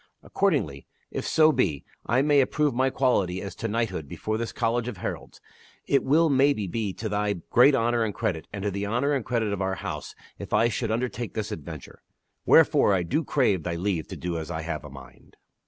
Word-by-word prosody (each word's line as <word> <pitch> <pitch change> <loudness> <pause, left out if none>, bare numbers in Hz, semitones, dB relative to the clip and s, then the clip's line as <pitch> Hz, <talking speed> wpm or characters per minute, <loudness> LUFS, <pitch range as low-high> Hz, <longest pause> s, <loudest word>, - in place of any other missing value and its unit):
Accordingly, - - -1 0.2
if - - -4
so 155 0 +5
be 95 - 0 0.2
I 125 +4 +3
may 145 -1 +4
approve 145 +1 +1
my 130 +2 +2
quality 100 -10 +1
as 95 -1 -6
to 115 - -3
knighthood 110 -9 -2
before 110 +9 -3
this 115 +1 -3
college 115 +1 -1
of 125 - -5
heralds, - - -6 0.5
it 140 - +2
will 160 +5 +4
maybe 140 -6 +3
be 105 +2 -2
to 110 - -5
thy 105 0 0 0.2
great 135 +4 +6
honor 120 -1 +1
and 110 - -1
credit, 90 -7 -3
and 100 -1 -6
to 105 - 0
the 100 +1 -3
honor 125 +7 +1
and 135 -4 0
credit 115 -4 -1
of 100 - -3
our 95 0 -1
house - - -6 0.2
if - - -7
I 115 - +4
should 115 0 -2
undertake 120 +1 -3
this 110 -2 -3
adventure. 80 -2 -8 0.5
Wherefore 100 - +5
I 90 - 0
do 150 - 0
crave 115 - +1
thy 85 +1 -3
leave 85 -2 -2
to - - -7
do 85 -1 -3
as 80 - -7
I 80 -2 -4
have 85 - -4
a 75 - -9
mind." 65 -2 -15
110 Hz, 210 wpm, -26 LUFS, 95-125 Hz, 0.5 s, great